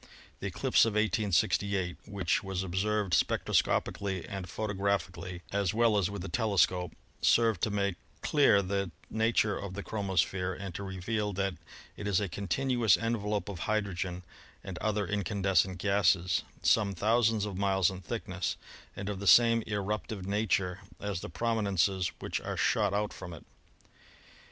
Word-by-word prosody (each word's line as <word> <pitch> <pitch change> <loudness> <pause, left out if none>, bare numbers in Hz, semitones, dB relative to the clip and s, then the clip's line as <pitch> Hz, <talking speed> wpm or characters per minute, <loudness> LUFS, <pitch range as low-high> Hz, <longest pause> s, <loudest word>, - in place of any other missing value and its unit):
The - - -3
eclipse - - +3
of 115 - +1
1868, 100 -2 +1
which 100 -5 0
was 95 -1 -3
observed 95 +1 -1
spectroscopically 95 -3 +1
and 95 -2 -6
photographically 95 -4 -2
as 100 -1 0
well 115 -1 +4
as 100 -3 +2
with 100 -3 -5
the - - -4
telescope, 90 -3 +1 0.3
served 115 -5 +3
to - - +1
make 100 -3 -1 0.3
clear 140 -9 +4
the 100 0 -1 0.2
nature 110 -2 +2
of 100 -2 -6
the 100 - -5
chromosphere 95 -3 -1
and 95 -2 -6
to 95 - -6
reveal 100 +2 -2
that 95 0 -1 0.4
it 105 - -5
is 100 -3 +2
a 105 - -1
continuous 115 +3 +2
envelope 105 -3 -1
of 100 -4 -6
hydrogen 95 -4 -1 0.4
and 90 -2 -6
other 105 -1 0
incandescent 95 -1 +1
gases, 95 -2 +2 0.2
some 100 -3 +3
thousands 110 +2 +2
of 100 -2 -5
miles 95 -2 +2
in 95 0 -8
thickness 90 -6 -3 0.4
and 100 - -5
of 100 -2 -3
the 100 - -4
same 115 +5 +7
eruptive 105 -1 -3
nature 100 -2 0 0.2
as 100 -4 -3
the - - -6
prominences 100 -2 0
which - - -3
are - - -4
shot 105 -3 +2
out 105 +1 -1
from 90 - -8
it. 80 - -14
100 Hz, 150 wpm, -30 LUFS, 95-105 Hz, 0.4 s, same